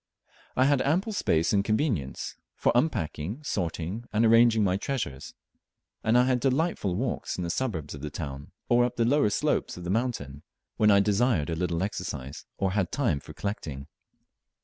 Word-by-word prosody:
I 130 - +4
had 140 -1 +3
ample 185 +10 +1
space 80 - +1
and 100 -1 +3
convenience 110 - -1 0.3
or - - +6
unpacking, 120 - -1
sorting, 90 - -3
and 110 +2 +3
arranging 115 -1 +5
my 95 -2 +2
treasures, 100 - -4 0.7
and 110 +2 +4
I 125 - +6
had 130 -1 +2
delightful 135 - 0
walks 125 +6 -2
in 90 - -2
the 85 - -1
suburbs 90 - -2
of 70 - -8
the 75 - -4
town, 70 -2 -6 0.2
or 120 0 +4
up 125 0 -1
the 115 -2 +2
lower 140 -2 +3
slopes 100 - 0
of 90 - -8
the 90 - -2
mountain, 100 - -2 0.4
when 105 - +4
I 100 -1 +6
desired 105 - +2
a - - -1
little 85 0 -1
exercise, 80 -9 -5
or 95 -1 0
had 95 -3 0
time 120 - +1
for - - -12
collecting. 75 -10 -5
105 Hz, 175 wpm, -27 LUFS, 80-125 Hz, 0.7 s, or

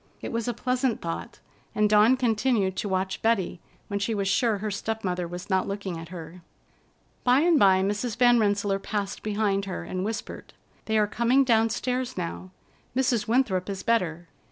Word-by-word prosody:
It - - -6
was 230 0 -2
a 240 - 0
pleasant 250 0 0
thought, 165 -1 -6 0.3
and 210 0 +3
Dawn 215 +4 +5
continued 225 -5 +1
to 205 - -2
watch 190 0 -1
Betty, 210 -6 +1 0.3
when 200 -1 -2
she 215 +2 -1
was 200 -1 -1
sure 210 +3 +2
her 210 +1 -3
step 220 +2 -3
mother 180 -2 -2
was 175 +1 -7
not 190 -2 +1
looking 195 -4 -4
at 165 0 -9
her. 170 0 -9 0.8
By 255 +2 +4
and 335 -2 +4
by 190 -1 +5
Mrs. 210 +4 -2
Van 245 -1 +5
Rensselaer 205 -2 +1
passed 200 0 -4
behind 205 -2 0
her 190 - -5
and 185 0 -4
whispered: 220 +2 -6 0.3
"They 220 0 +1
are 210 - +4
coming 235 +6 +2
downstairs 250 +1 0
now. 180 +1 -5 0.5
Mrs. 245 -4 +1
Winthrop 220 -6 +1
is 195 -1 -4
better. 175 -7 0
210 Hz, 180 wpm, -26 LUFS, 190-235 Hz, 0.8 s, Dawn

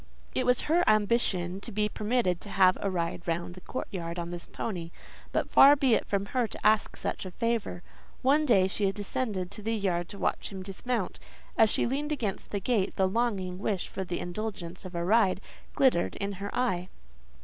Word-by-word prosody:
It - - 0
was 250 0 +4
her 340 +3 +2
ambition 205 -4 +1
to - - -6
be 210 +1 +1
permitted 210 -4 0
to 205 - -7
have 185 -2 +5
a 200 - 0
ride 170 -1 -3
round 170 +1 -2
the 185 - -12
courtyard 175 -8 -5
on 170 0 -4
this 175 -1 -7
pony; 175 -7 -4 0.4
but - - -1
far 280 +1 +9
be 270 -4 +3
it - - +1
from 200 -1 0
her 250 -3 +2
to - - -9
ask 215 0 +3
such - - -3
a 185 - -5
favour. 230 -3 -2 0.4
One 285 +4 +4
day 195 -10 +4
she 195 0 +1
descended 200 -2 -3
to 210 - -7
the 225 +2 -1
yard 180 -5 -1
to 200 - -7
watch - - -1
him 190 -1 -6
dismount; 200 +2 -3 0.4
as 220 - +5
she - - +2
leaned 285 +5 -1
against 230 -10 -2
the 200 - -2
gate, 195 -1 0
the 190 - +3
longing 190 -4 -1
wish 200 -3 -2
for 190 - -4
the 175 -1 -3
indulgence 180 -2 -5
of 185 -1 -8
a 170 0 -1
ride 200 -2 +4 0.4
glittered 255 -11 +3
in 200 0 -2
her 200 +1 -5
eye. 185 -8 0
200 Hz, 200 wpm, -29 LUFS, 180-230 Hz, 0.4 s, far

